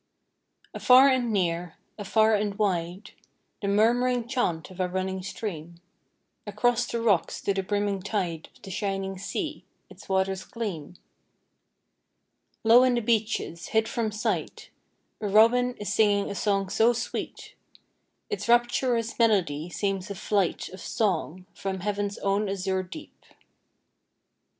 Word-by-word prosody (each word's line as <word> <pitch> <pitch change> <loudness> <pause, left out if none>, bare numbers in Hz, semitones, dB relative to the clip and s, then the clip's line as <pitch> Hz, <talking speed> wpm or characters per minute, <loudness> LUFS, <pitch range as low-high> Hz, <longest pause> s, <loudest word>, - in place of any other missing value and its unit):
Afar 260 +2 +6
and 250 -3 +1
near, 175 -4 -1 0.2
afar 220 +2 +2
and 205 -1 0
wide, 185 -1 -2 0.5
The 200 - -2
murm'ring 240 +4 +2
chant 190 -11 -1
of 185 - -13
a 185 - +1
running 190 +1 -2
stream, 180 -4 -6 0.7
Across 240 +4 +1
the 235 - -2
rocks 210 -7 +1
to 200 - 0
the 195 - -1
brimming 205 0 -1
tide 180 -5 -3
Of - - -24
the 195 - -8
shining 195 -1 -3
sea, - - -4 0.3
its - - -15
waters 190 0 0
gleam. 180 -8 -6 1.7
Low 230 +2 +7
in 255 -1 +3
the 240 - 0
beeches, 215 -6 -1
hid 220 0 +1
from 225 -1 -2
sight, 210 0 -3 0.5
A 210 - -1
robin 240 +4 +4
is 205 - -3
singing 205 -2 +2
a - - -3
song 195 -1 0
so 230 +5 +3
sweet, 235 - -5 0.7
Its 420 - -4
rapturous 240 -1 +2
melody 180 -9 +2
seems 195 0 -2
a 200 - -5
flight 195 -2 0
Of 185 -1 -11
song 185 -4 -1
from 190 -1 -4
Heaven's 205 0 -2
own 200 +1 0
azure 190 -1 -1
deep. 185 - -11
205 Hz, 135 wpm, -26 LUFS, 190-225 Hz, 1.7 s, Low